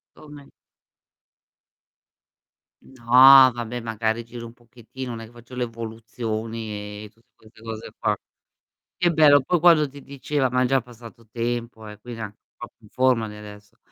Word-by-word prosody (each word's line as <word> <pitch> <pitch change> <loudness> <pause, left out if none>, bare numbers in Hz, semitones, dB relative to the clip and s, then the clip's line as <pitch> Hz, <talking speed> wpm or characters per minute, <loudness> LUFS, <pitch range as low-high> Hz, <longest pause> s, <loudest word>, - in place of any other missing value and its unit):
Ome 145 -2 -14 2.3
No, 130 +1 +7
vabbè, 120 0 -5
magari 115 0 -2
giro 115 0 -9
un 115 - -14
pochettino, 120 +2 -10
non 115 - -6
è - - -8
che - - -19
faccio 120 +1 -16
le 125 -1 -2
evoluzioni, 110 -2 -6
e 105 - -11
tutte 115 +1 -32
queste 110 0 -21
cose 115 -1 -8
qua. 105 -1 0 0.8
Che 175 -1 +2
bello, 150 -3 +6
poi 175 +4 0
quando 160 -4 +5
ti 140 0 -13
diceva, 140 -1 -2
ma 125 +1 +1
è - - +2
già 135 +1 +2
passato 115 -1 -15
tempo 115 -1 -4
eh, 105 0 -11
quindi 120 0 -9
er 110 - -4
anche 105 +1 -17
un - - -68
po' - - -8
più - - -72
in - - -18
forma 125 -3 +1
di 105 - -10
adesso. 105 -1 -13
115 Hz, 175 wpm, -23 LUFS, 110-130 Hz, 2.3 s, No